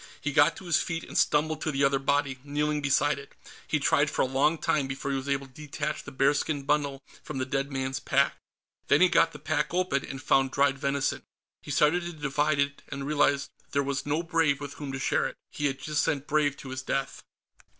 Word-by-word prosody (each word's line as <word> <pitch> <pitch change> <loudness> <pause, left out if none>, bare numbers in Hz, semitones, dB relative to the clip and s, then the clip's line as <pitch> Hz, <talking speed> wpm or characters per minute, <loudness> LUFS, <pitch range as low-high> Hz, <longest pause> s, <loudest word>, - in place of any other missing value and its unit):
He 150 - -2
got 150 +2 +5
to 190 - -11
his 170 -3 +2
feet 165 -1 -3
and - - -10
stumbled 155 +1 +2
to 155 - -1
the 140 0 0
other 140 0 +3
body, 140 -1 0
kneeling 150 +1 -1
beside 140 +1 +2
it. 140 - -13 0.3
He - - +1
tried - - +3
for - - 0
a - - +2
long 140 +5 +2
time 150 -3 0
before 135 +1 -4
he 135 - 0
was 135 +1 -5
able 140 0 0
to 130 - -19
detach 150 +1 -4
the 140 - -9
bearskin 140 +2 +1
bundle 140 -1 0 0.2
from 150 - -6
the 130 - -1
dead 135 +1 -2
man's 130 0 -2
pack. 140 +1 +2 0.5
Then 145 - +5
he 185 - +7
got 165 - +4
the - - -9
pack 150 +2 -1
open, 180 -7 +1
and 135 - -6
found 135 -1 +2
dried 140 0 +2
venison. 140 0 0 0.4
He - - -12
started 155 +4 +3
to 175 0 -6
divide 150 0 0
it, 140 0 0
and 140 -1 -5
realized 145 -1 +1
that - - -30
there 140 0 +2
was 140 0 -3
no 155 +3 0
Brave 165 -4 +1
with 145 -1 -6
whom 145 -2 -6
to 135 - -4
share 130 - +1
it. - - -9
He 145 - -1
had 135 -1 -2
just 150 +1 -1
sent 140 -1 -1
Brave 145 -2 +1
to 135 - -9
his 130 0 -4
death. 135 +1 -3
140 Hz, 235 wpm, -28 LUFS, 135-150 Hz, 0.5 s, he